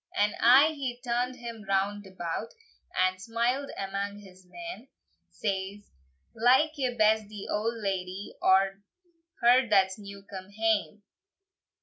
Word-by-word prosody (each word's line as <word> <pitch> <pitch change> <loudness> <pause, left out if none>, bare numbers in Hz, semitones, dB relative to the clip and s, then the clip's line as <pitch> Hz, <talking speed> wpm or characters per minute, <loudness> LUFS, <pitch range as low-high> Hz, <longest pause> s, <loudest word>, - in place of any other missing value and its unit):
And 205 +1 +3
aye 265 +6 +7
he 255 -4 -4
turn'd 245 +1 -1
him 235 -3 -8
round 200 +1 0
about, 185 +3 -5 0.4
And 185 0 +1
smiled 235 +5 -1
amang 200 +1 -3
his 190 -2 -15
men; 335 - -8 0.4
Says, 200 0 -4 0.4
"Like 260 +7 +4
ye 255 -4 -2
best 215 -1 +3
the 205 -1 -8
old 225 +3 -1
ladye, 195 -2 -4
Or 195 +1 +3 0.6
her 245 +1 +5
that's 195 -1 +3
new 200 -1 -10
come 190 -1 -9
hame?" 215 -1 0
210 Hz, 125 wpm, -28 LUFS, 195-240 Hz, 0.6 s, aye